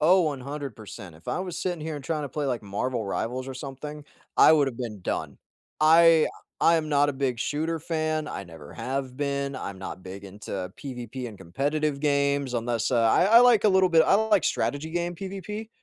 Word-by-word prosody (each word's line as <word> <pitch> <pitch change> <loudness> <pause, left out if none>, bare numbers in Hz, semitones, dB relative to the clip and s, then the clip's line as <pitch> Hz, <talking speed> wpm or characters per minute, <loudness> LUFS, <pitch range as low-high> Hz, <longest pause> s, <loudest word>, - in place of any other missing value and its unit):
Oh, 180 +4 +5
100%. 135 - -5
If 80 +1 -14
I - - -1
was 180 -3 -5
sitting 175 -3 -2
here 155 +1 -4
and 140 - -9
tryna 150 -2 -3
play, 150 -2 -2
like, 125 -4 -2
Marvel 110 +4 -2
Rivals 120 +6 -3
or 135 - -6
something, 145 +3 -7 0.3
I - - +8
would've 140 -6 +2
been 115 -5 -5
done. - - -3 0.4
I 165 +1 +6 0.4
I 170 - +6
am 155 -1 -1
not 145 0 +4
a - - 0
big 130 -3 -1
shooter 160 +6 -1
fan, 155 -1 -1
I 100 - -5
never 80 -4 -12
have 130 -1 -4
been, 140 -1 -2
I'm 100 -6 -6
not 95 0 -7
big 95 +2 -9
into 95 -2 -6
PvP 125 -1 -6
and 105 -3 -12
competitive 145 - -1
games 140 -2 +1
unless 115 -1 -1
a 125 - +2
I 115 +8 +4
I 230 +3 +8
like 245 -4 +5
a - - +7
little 190 -1 +4
bit 165 -2 +5
I - - +5
don't 220 +1 0
like 205 -5 +4
strategy 145 +3 -1
game 175 +1 -2
PvP. 195 +3 -6
140 Hz, 200 wpm, -26 LUFS, 120-160 Hz, 0.4 s, I